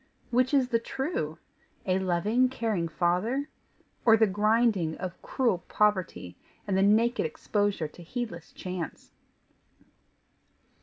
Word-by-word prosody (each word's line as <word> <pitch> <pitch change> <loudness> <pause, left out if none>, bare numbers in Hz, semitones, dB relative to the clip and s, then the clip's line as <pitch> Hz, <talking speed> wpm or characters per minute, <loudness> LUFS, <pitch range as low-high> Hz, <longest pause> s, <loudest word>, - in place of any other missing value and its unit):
Which 255 +1 +3
is 270 -4 +3
the 230 -2 +2
true? 230 - -3 0.5
a 185 0 +2
loving, 205 +8 +2
caring 220 -9 -1
father, 180 - 0 0.5
or 225 -1 +6
the 220 - +5
grinding 210 -4 +2
of 185 -1 -6
cruel 235 -9 0
poverty 185 - 0 0.3
and 195 - -1
the 190 - +3
naked 225 +5 +3
exposure 205 0 -1
to 175 - -14
heedless 175 -3 -6
chance? 180 -3 -6
205 Hz, 115 wpm, -28 LUFS, 175-235 Hz, 0.5 s, or